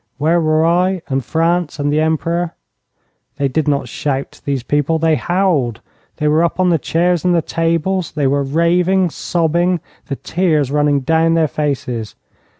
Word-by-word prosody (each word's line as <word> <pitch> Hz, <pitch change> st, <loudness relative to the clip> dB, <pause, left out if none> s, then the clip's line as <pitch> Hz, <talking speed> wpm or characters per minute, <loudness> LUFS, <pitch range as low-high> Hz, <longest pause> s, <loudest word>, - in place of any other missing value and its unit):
Where 160 Hz, +4 st, +2 dB
were 155 Hz, 0 st, +2 dB
I, 180 Hz, +2 st, +1 dB
and 135 Hz, -1 st, -1 dB
France, 165 Hz, +4 st, 0 dB
and 145 Hz, 0 st, -1 dB
the 150 Hz, -, +2 dB
Emperor? 165 Hz, +2 st, -1 dB, 0.8 s
They 140 Hz, -1 st, 0 dB
did 155 Hz, +4 st, -1 dB
not 140 Hz, -1 st, 0 dB
shout, 145 Hz, -3 st, -4 dB
these 140 Hz, -3 st, -1 dB
people 145 Hz, +4 st, 0 dB
they 160 Hz, 0 st, +2 dB
howled. 155 Hz, -, 0 dB, 0.4 s
They 150 Hz, -, 0 dB
were 155 Hz, +2 st, +3 dB
up 170 Hz, -, -1 dB
on 185 Hz, -1 st, +3 dB
the 165 Hz, -, +2 dB
chairs 170 Hz, +4 st, 0 dB
and 180 Hz, -1 st, +2 dB
the 170 Hz, -, +3 dB
tables. 165 Hz, +2 st, -1 dB
They 145 Hz, -2 st, -1 dB
were 140 Hz, +1 st, +2 dB
raving, 170 Hz, +5 st, +2 dB
sobbing, 175 Hz, +2 st, 0 dB, 0.3 s
the 140 Hz, -, -3 dB
tears 155 Hz, -5 st, 0 dB
running 145 Hz, -1 st, +2 dB
down 165 Hz, +3 st, +2 dB
their 160 Hz, -1 st, +3 dB
faces. 130 Hz, -7 st, -3 dB
160 Hz, 165 wpm, -17 LUFS, 145-170 Hz, 0.8 s, were